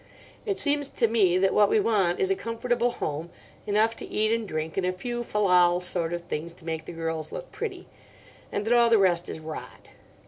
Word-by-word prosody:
It 400 -2 0
seems 290 -1 0
to 235 - +1
me 200 -6 +3
that 190 +1 +2
what 205 -1 +5
we - - +3
want 195 -5 +1
is 190 - +1
a - - +3
comfortable 240 +2 -1
home, 155 -4 -4 0.4
enough 215 +2 +2
to - - -6
eat 215 +1 0
and 230 -1 0
drink, 155 -2 -4
and 190 - 0
a 180 - +1
few 240 +6 -4
fal 210 -3 -1
lal 180 -2 +5
sort 180 -2 +1
of 175 0 -3
things 170 0 -5
to 170 - -16
make 160 -1 -4
the - - -7
girls 165 -1 -4
look - - -7
pretty; 390 -5 -5 0.6
and 205 - -2
that 230 - +2
all 235 -1 +5
the 230 - +6
rest 175 -3 +2
is - - -5
rot. 155 0 -9
195 Hz, 220 wpm, -26 LUFS, 170-230 Hz, 0.6 s, the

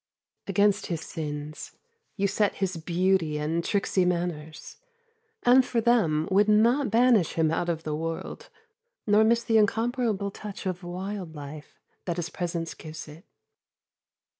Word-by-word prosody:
Against 200 +1 +2
his 165 -3 -3
sins 150 -2 -6 0.4
you 200 -1 +1
set 205 +1 +1
his 190 -2 -2
beauty 170 -1 +1
and 160 +3 -1
tricksy 195 -1 +1
manners, 170 -3 -3 0.7
and 255 +2 +6
for 245 -1 -1
them 205 -10 +2
would 205 +2 +4
not 235 +6 +4
banish 230 -5 +4
him 160 -1 +1
out 170 +1 -1
of 165 -1 -2
the 155 - -3
world 165 +1 -5 0.6
nor 210 +1 +5
miss 235 +1 +3
the 225 -1 +3
incomparable 220 -1 0
touch 205 0 -8
of 185 -1 -3
wild 180 -1 -6
life 145 +1 -10 0.3
that 175 -2 -2
his 170 -1 -3
presence 170 -2 -3
gives 155 0 -9
it. 155 +6 -13
180 Hz, 140 wpm, -27 LUFS, 160-210 Hz, 0.7 s, and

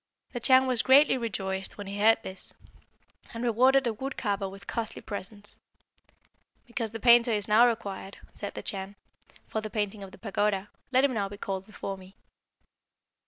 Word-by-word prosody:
"The 240 - -3
Chan 260 +2 +5
was 250 -3 +2
greatly 275 +3 +6
rejoiced 195 -5 -3
when 205 - -6
he 200 +1 -5
heard 220 +2 +6
this, 190 0 -6 0.8
and 230 - -4
rewarded 255 +3 +4
the 235 -3 0
wood 265 +5 -5
carver 200 -3 -1
with 195 +1 -12
costly 230 -1 -3
presents. 205 0 -6 1.1
'Because 235 -2 -2
the 225 +1 -7
painter 235 +1 +6
is 210 0 0
now 225 +3 +6
required,' 200 -4 -4 0.2
said 200 - -6
the - - -6
Chan, 195 0 -5 0.5
'for 220 - -2
the 215 - -5
painting 205 -1 -2
of 195 -1 -8
the - - -13
pagoda, 205 -2 -1 0.2
let 260 +1 +4
him 280 -2 +3
now 200 -3 -1
be 205 - -9
called 195 -1 -4
before 195 -2 -6
me.' 190 +1 -15
215 Hz, 175 wpm, -28 LUFS, 195-235 Hz, 1.1 s, greatly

